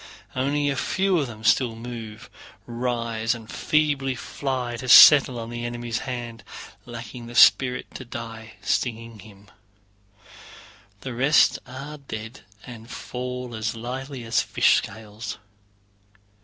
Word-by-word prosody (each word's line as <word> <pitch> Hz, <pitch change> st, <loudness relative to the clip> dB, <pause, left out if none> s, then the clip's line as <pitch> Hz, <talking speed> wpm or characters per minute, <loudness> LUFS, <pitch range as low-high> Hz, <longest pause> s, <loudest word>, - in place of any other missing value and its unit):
Only 145 Hz, +3 st, 0 dB
a -, -, -2 dB
few 190 Hz, +6 st, +1 dB
of 140 Hz, -, -1 dB
them 110 Hz, -2 st, -10 dB
still 115 Hz, +1 st, +3 dB
move, 115 Hz, -2 st, -8 dB, 0.4 s
rise, 115 Hz, -1 st, -2 dB
and 115 Hz, -2 st, -11 dB
feebly 140 Hz, 0 st, 0 dB
fly 130 Hz, -2 st, -4 dB
to 125 Hz, +2 st, -6 dB
settle 135 Hz, -2 st, +9 dB
on 115 Hz, 0 st, -7 dB
the 120 Hz, 0 st, -5 dB
enemy's 120 Hz, 0 st, -3 dB
hand, 120 Hz, -4 st, -6 dB, 0.4 s
lacking 120 Hz, 0 st, -8 dB
the 120 Hz, -, -10 dB
spirit 125 Hz, 0 st, +5 dB
to -, -, -7 dB
die 115 Hz, -2 st, -8 dB
stinging 115 Hz, +1 st, -2 dB
him; 100 Hz, 0 st, -16 dB, 1.5 s
the 130 Hz, -, -6 dB
rest 135 Hz, +5 st, +4 dB
are 140 Hz, +4 st, -8 dB
dead 115 Hz, -2 st, -8 dB, 0.3 s
and 115 Hz, -2 st, -11 dB
fall 125 Hz, -1 st, -6 dB
as 110 Hz, +1 st, -3 dB
lightly 130 Hz, +3 st, -6 dB
as 115 Hz, 0 st, +1 dB
fish -, -, +3 dB
scales. 110 Hz, 0 st, -6 dB
120 Hz, 130 wpm, -24 LUFS, 115-130 Hz, 1.5 s, settle